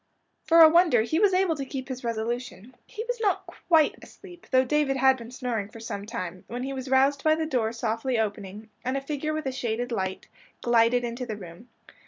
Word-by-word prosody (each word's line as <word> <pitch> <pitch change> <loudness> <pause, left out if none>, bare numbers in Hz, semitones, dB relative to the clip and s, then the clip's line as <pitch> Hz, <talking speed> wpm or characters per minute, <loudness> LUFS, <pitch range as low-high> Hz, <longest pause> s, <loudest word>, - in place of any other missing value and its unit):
For 330 0 +6
a - - +11
wonder 320 -8 +4
he 315 +8 0
was 410 -1 +4
able 370 -3 +2
to 280 - -4
keep 265 -1 -6
his 260 -1 -6
resolution. 235 0 -4
He 440 - -6
was - - -2
not 390 -2 +1
quite 335 -3 +1
asleep, 355 -3 -14
though 260 0 +4
David 280 0 +1
had 265 0 +5
been 235 -2 -10
snoring 240 -5 -3
for 225 - -12
some 205 -2 -6
time, 185 -6 -6
when 245 +2 -5
he 270 +1 -4
was 260 -1 -6
roused 275 +1 +3
by 310 0 +4
the 320 0 -2
door 245 -7 0
softly 230 +2 -2
opening, 210 0 -4
and 255 +2 -1
a - - -3
figure 295 +2 -3
with 310 -1 -3
a 265 - -1
shaded 245 -1 -3
light, 190 -4 -3 0.4
glided 240 +1 +3
into 240 +1 -4
the 215 -2 -4
room. 185 +5 -12
255 Hz, 215 wpm, -26 LUFS, 230-300 Hz, 0.4 s, a